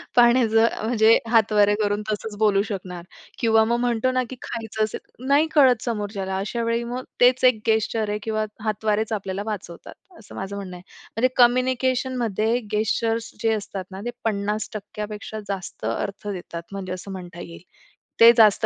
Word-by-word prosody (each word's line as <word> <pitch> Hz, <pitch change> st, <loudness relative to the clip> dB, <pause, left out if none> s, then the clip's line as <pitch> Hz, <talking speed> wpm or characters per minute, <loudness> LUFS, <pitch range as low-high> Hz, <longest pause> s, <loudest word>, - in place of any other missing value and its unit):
पाण्याचं, 235 Hz, -2 st, +5 dB, 0.2 s
म्हणजे 225 Hz, -1 st, +5 dB
हातवारे 210 Hz, -2 st, +4 dB
करून 205 Hz, 0 st, 0 dB
तसंच 210 Hz, 0 st, -4 dB
बोलू 205 Hz, -2 st, +4 dB
शकणार 180 Hz, -4 st, -6 dB, 0.4 s
किंवा 225 Hz, -1 st, +4 dB
मग 235 Hz, +2 st, +1 dB
म्हणतो 245 Hz, +1 st, +1 dB
ना, 255 Hz, 0 st, +1 dB
की 260 Hz, -, -7 dB
खायचं 220 Hz, -1 st, -3 dB
असेल 215 Hz, -, -3 dB, 0.3 s
नाही, 285 Hz, +3 st, +4 dB
कळत 255 Hz, -6 st, +5 dB
समोरच्याला. 205 Hz, -4 st, -3 dB
अशा 220 Hz, +4 st, -3 dB
वेळी 230 Hz, +1 st, 0 dB
मग 245 Hz, +2 st, -5 dB, 0.2 s
तेच 250 Hz, +1 st, +5 dB
एक 250 Hz, -4 st, +5 dB
गेस्चर 220 Hz, -1 st, +1 dB
आहे 210 Hz, 0 st, -2 dB
किंवा 215 Hz, -1 st, -1 dB, 0.2 s
हातवारेच 215 Hz, +1 st, 0 dB
आपल्याला 195 Hz, -1 st, -3 dB
वाचवतात, 205 Hz, -5 st, -7 dB, 0.3 s
असं 205 Hz, -, -14 dB
माझं 195 Hz, +1 st, -5 dB
म्हणणं 190 Hz, -2 st, -7 dB
आहे. 175 Hz, -, -14 dB, 0.3 s
म्हणजे 255 Hz, +2 st, +2 dB
कम्युनिकेशनमध्ये 245 Hz, -2 st, +2 dB
गेस्चर्स 225 Hz, +2 st, 0 dB
जे 225 Hz, -1 st, +2 dB
असतात 200 Hz, -3 st, -4 dB
ना, 190 Hz, +1 st, -7 dB
ते -, -, -1 dB
50% 210 Hz, 0 st, -3 dB
पेक्षा 210 Hz, +1 st, -7 dB
जास्त 190 Hz, -, -5 dB
अर्थ 200 Hz, -, -3 dB
देतात 175 Hz, -4 st, -6 dB
म्हणजे 190 Hz, -2 st, -5 dB
असं 185 Hz, +2 st, -8 dB
म्हणता 175 Hz, -2 st, -8 dB
येईल. 170 Hz, -1 st, -10 dB, 0.6 s
ते 230 Hz, +1 st, +10 dB
जास्त 215 Hz, -3 st, +5 dB
215 Hz, 160 wpm, -23 LUFS, 200-235 Hz, 0.6 s, ते